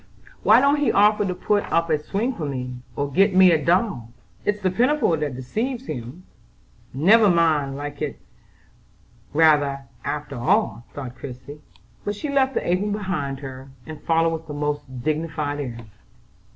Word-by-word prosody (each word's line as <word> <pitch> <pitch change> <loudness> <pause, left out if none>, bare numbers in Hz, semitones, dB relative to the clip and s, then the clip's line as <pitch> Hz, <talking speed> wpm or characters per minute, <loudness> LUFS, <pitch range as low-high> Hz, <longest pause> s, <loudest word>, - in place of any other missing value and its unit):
"Why 220 +3 +6
don't 280 +2 +3
he 290 - +2
offer 210 0 +4
to 180 - -2
put 205 +3 +1
up 165 0 +1
a 155 - +2
swing 205 +11 -2
for 160 -10 -4
me, 125 -2 -4 0.2
or 140 0 -2
get 195 +6 +3
me 185 -1 +7
a 155 -3 +2
doll? 175 - +1 0.4
It's 205 0 0
the 190 -2 0
pinafore 245 - +2
that 150 -4 -3
deceives 230 - -3
him. 125 - -7 0.7
Never 205 - +5
mind: 155 -5 +2
I 145 0 -4 1.2
rather 150 -1 +5
like 140 0 -4
it 135 - -19 0.2
after 145 -3 -4
all," 180 - +1
thought 130 -4 -6
Christie; 135 +3 -9 0.4
but 205 - -2
she 285 +9 -5
left 270 -1 +2
the - - -1
apron 185 +4 +1
behind 175 -10 -3
her, 135 -1 -8 0.2
and 155 -1 -9
followed 165 0 +2
with 160 0 -6
the 150 - -6
most 145 -4 -4
dignified 155 -1 -2
air. 125 -5 -5
160 Hz, 165 wpm, -23 LUFS, 140-205 Hz, 1.2 s, me